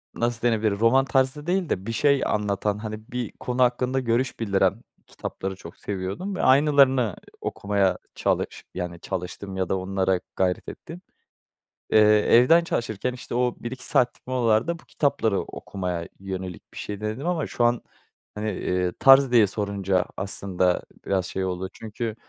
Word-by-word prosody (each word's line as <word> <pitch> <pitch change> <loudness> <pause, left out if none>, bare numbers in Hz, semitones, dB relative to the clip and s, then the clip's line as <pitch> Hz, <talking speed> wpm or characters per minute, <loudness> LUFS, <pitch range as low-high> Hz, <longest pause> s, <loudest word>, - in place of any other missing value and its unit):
nasıl 120 -1 -1
denebilir, 110 -2 +2
roman 130 +4 +4
tarzı 135 +2 +1
değil 180 -1 0
de 95 +2 -2
bir 115 - -3
şey 140 +3 +3
anlatan, 105 0 0
hani, 110 0 -7
bir 125 -3 -3
konu 125 0 +1
hakkında 125 +2 +1
görüş 125 +1 0
bildiren 100 -4 +1 0.3
kitapları 95 0 -5
çok 85 -2 -12
seviyordum 100 - -4
ve - - -2
aynılarını 135 - +4 0.3
okumaya 100 -3 0 0.2
çalış - - -1
yani, 90 -2 -5
çalıştım 95 +1 -5
ya 95 -2 -1
da 95 - +1
onlara 95 0 0 0.2
gayret 90 -1 0
ettim. 170 +3 -10 0.9
Eee, 110 - +5
evden 120 +10 +6
çalışırken, 120 - -2
işte, 125 -1 -7
o 125 0 +1
1-2 125 +2 -5
saatlik 125 0 +1
molalarda 125 +5 +1
bu - - -20
kitapları 115 -8 0
okumaya 90 -3 -5
yönelik 95 -2 -6
bir - - -9
şey 105 0 -5
denedim. 110 +9 -3
Ama 170 -4 0
şu 120 - -1
an, 120 0 +3 0.6
hani, 105 +1 -2
eee, 90 -1 -1
tarz 135 -1 +7
diye 115 -4 +6
sorunca 100 -2 -1
aslında 95 -2 0 0.2
biraz 95 -2 0
şey 95 +2 -2
oldu. 95 0 -3
Çünkü 110 0 -5
110 Hz, 155 wpm, -25 LUFS, 95-125 Hz, 0.9 s, tarz